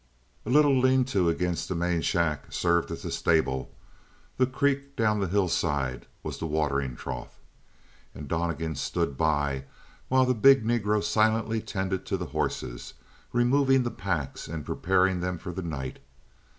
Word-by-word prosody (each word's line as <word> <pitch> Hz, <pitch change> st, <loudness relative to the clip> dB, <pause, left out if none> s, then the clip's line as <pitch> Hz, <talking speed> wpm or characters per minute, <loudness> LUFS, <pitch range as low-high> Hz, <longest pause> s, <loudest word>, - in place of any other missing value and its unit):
A -, -, -2 dB
little 145 Hz, +1 st, +5 dB
lean 130 Hz, 0 st, +4 dB
to 90 Hz, -4 st, +3 dB
against 85 Hz, +1 st, -1 dB
the 95 Hz, -, -1 dB
main 85 Hz, 0 st, 0 dB
shack 80 Hz, -5 st, 0 dB
served 85 Hz, -1 st, +1 dB
as -, -, -6 dB
a -, -, -3 dB
stable; 65 Hz, -6 st, +1 dB, 0.7 s
the 130 Hz, -, +3 dB
creek 140 Hz, +1 st, -1 dB
down 105 Hz, -2 st, +2 dB
the 95 Hz, -, 0 dB
hillside 80 Hz, -9 st, 0 dB, 0.2 s
was -, -, -5 dB
the 80 Hz, -, -3 dB
watering 70 Hz, -4 st, -1 dB
trough. 60 Hz, -1 st, -7 dB, 0.8 s
And 75 Hz, -, -8 dB
Donnegan 80 Hz, -1 st, -2 dB
stood 70 Hz, +1 st, -2 dB
by 70 Hz, -2 st, 0 dB, 0.4 s
while 130 Hz, 0 st, +4 dB
the 125 Hz, -, +2 dB
big 135 Hz, +1 st, +5 dB
Negro 105 Hz, -3 st, +1 dB
silently 110 Hz, +1 st, +1 dB
tended 95 Hz, -2 st, -3 dB
to -, -, 0 dB
the -, -, -4 dB
horses -, -, -3 dB, 0.4 s
removing 130 Hz, +2 st, +3 dB
the 120 Hz, -, -2 dB
packs 85 Hz, -8 st, -3 dB
and 80 Hz, -2 st, -5 dB
preparing 95 Hz, 0 st, +1 dB
them 90 Hz, 0 st, -2 dB
for 90 Hz, -, -7 dB
the 95 Hz, -, -5 dB
night. 75 Hz, -7 st, -5 dB
90 Hz, 155 wpm, -27 LUFS, 80-115 Hz, 0.8 s, little